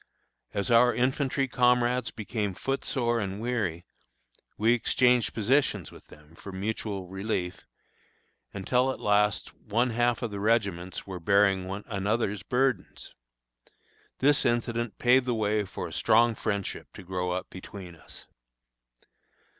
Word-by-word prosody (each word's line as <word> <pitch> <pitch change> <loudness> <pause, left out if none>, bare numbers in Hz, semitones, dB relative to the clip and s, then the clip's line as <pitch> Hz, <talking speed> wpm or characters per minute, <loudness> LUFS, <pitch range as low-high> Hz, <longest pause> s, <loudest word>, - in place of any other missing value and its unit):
As 100 +4 -2
our 120 +1 +5
infantry 135 +1 +1
comrades 125 0 +2
became 105 -3 -3
foot 135 +7 -2
sore 120 -3 0
and 100 -1 -3
weary, 105 -8 -2 0.7
we 115 +3 +4
exchanged 125 -1 +3
positions 110 - +1
with - - -15
them, 75 +1 -17
for 100 +4 -10
mutual 100 0 -4
relief, 95 -1 -4 0.8
until 125 +7 +1
at - - -7
last 105 0 +1
one 120 +4 -1
half 120 +1 +1
of 115 - -2
the 100 - -5
regiments 100 -5 0
were 95 -2 -6
bearing 95 +1 +3
one 95 +2 -5
another's 105 -1 -1
burdens. 125 -3 -1 1.0
This 145 +1 +3
incident 120 -2 -1
paved 125 +1 +4
the 120 - +1
way 105 -1 0
for - - -6
a - - -11
strong 115 +1 +4
friendship 100 -2 -3
to - - -10
grow 90 0 -3
up 90 +1 -3
between 95 -2 -9
us. 75 - -13
110 Hz, 135 wpm, -28 LUFS, 95-120 Hz, 1.0 s, our